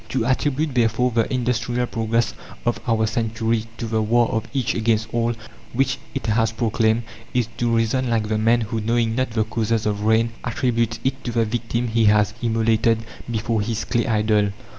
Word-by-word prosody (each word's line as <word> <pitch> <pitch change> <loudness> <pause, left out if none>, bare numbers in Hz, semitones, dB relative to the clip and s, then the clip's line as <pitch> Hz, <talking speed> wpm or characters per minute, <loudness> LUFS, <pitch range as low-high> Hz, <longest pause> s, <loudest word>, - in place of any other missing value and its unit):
To 125 -4 0
attribute, 145 +3 0
therefore, 120 +1 +2
the 115 -1 0
industrial 125 -1 0
progress 115 -1 0 0.3
of 120 - 0
our 110 -2 +2
century 115 0 -1
to - - -4
the 110 -1 0
war 115 +2 +3
of 110 0 -2
each 130 -3 0
against 110 -1 0
all 120 0 +1 0.4
which 135 +3 +1 0.2
it 135 - -3
has 110 0 +2
proclaimed, 110 0 +1 0.3
is 125 -3 +2
to 120 - 0
reason 115 +3 +1
like 110 -2 +1
the 110 0 0
man 115 +2 +3
who, 110 0 -2
knowing 115 +1 +1
not 130 +2 0
the 110 -1 0
causes 110 0 -1
of 105 -1 -1
rain, 110 +1 +3
attributes 115 -2 0
it 130 0 -1
to 120 - -1
the 115 -1 +2
victim 115 +1 -2
he 115 0 +2
has 105 0 +4
immolated 115 -1 +2 0.3
before 115 -1 0
his 110 +1 -2
clay 120 - 0
idol. 105 -2 +2
115 Hz, 185 wpm, -22 LUFS, 110-120 Hz, 0.4 s, has